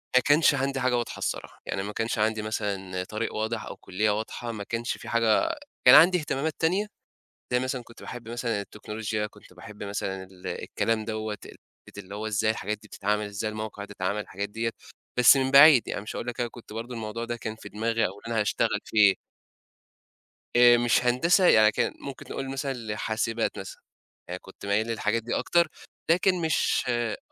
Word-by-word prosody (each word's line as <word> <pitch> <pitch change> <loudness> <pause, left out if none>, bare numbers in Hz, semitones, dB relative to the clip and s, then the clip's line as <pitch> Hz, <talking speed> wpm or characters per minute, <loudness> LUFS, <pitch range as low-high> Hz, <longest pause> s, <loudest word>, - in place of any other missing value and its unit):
ما 130 - +7
كانش 145 +2 +5
عَندي 135 0 -1
حاجة 125 -1 +2
واضحة 120 - -3
الصراحة. - - -4
يعني 95 - -3
ما 105 +1 -5
كانش 115 +1 -2
عَندي 110 0 +1
مثلًا 100 -4 -3
طريق 110 +4 -4
واضح 110 0 -2
أو - - -7
كُلّية 105 +4 -1
واضحة، 110 +2 -4
ما 105 -2 -6
كانش 115 +3 -3
في - - -9
حاجة 115 - +3 0.3
كان 125 - +10
عَندي 180 +3 +8
إهتمامات 155 -1 -2
تانية، 185 +6 +2 0.7
زي 125 - +3
مثلًا 130 -1 -3
كنت 115 - -16
باحب 120 -2 -8
مثلًا 115 -3 -2
التكنولوجيا، 105 +1 -4
كنت 105 -3 -18
باحب 105 +3 -10
مثلًا 95 -1 -3
ال 95 -1 -11
الكلام 110 -1 -2
دَوّة، 110 -1 -3
ال - - -12 0.3
حتّة - - -11
اللي 100 +1 -9
هو 110 +1 -4
إزاي 110 0 +1
الحاجات 105 0 -3
دي 105 - -15
بتتعمل؟ 105 +1 -1
إزاي 105 +1 -3
الموقع 110 -1 -6
ده - - -15
اتعمل؟ 100 +3 0
الحاجات 100 0 -5
ديّة. 115 +2 -2 0.5
بس 125 +2 +8
من 130 0 0
بعيد، 140 -2 +8
يعني - - -3
مش 105 - -7
هاقول 115 - -5
لك 120 - -4
أنا 120 -1 0
كنت 115 -2 -13
برضه 115 +3 -5
الموضوع 115 +1 -4
ده 120 0 -4
كان 110 -1 -5
في - - -11
دماغي 115 +2 0
أو - - -2
اللي 115 +2 -6
أنا 110 - +2
هاشتغل 105 - +1
فيه. 100 -3 +5 1.4
آآ 120 0 +8
مش 120 +1 +2
هندسة، 170 +10 +4
يعني 110 -1 +6
كان - - 0
ممكن 140 -2 -8
نقول 135 0 -4
مثلًا 135 0 -2
لحاسبات 115 0 -2
مثلًا، - - -9 0.5
يعني 90 +1 -4
كنت 95 - -13
ميّال 100 +3 +1
للحاجات 115 0 -1
دي 120 - -2
أكتر، 170 -1 +2 0.4
لكن 180 +1 +3
مش 160 -2 +1
آه، 120 -3 -1
115 Hz, 195 wpm, -27 LUFS, 105-125 Hz, 1.4 s, كان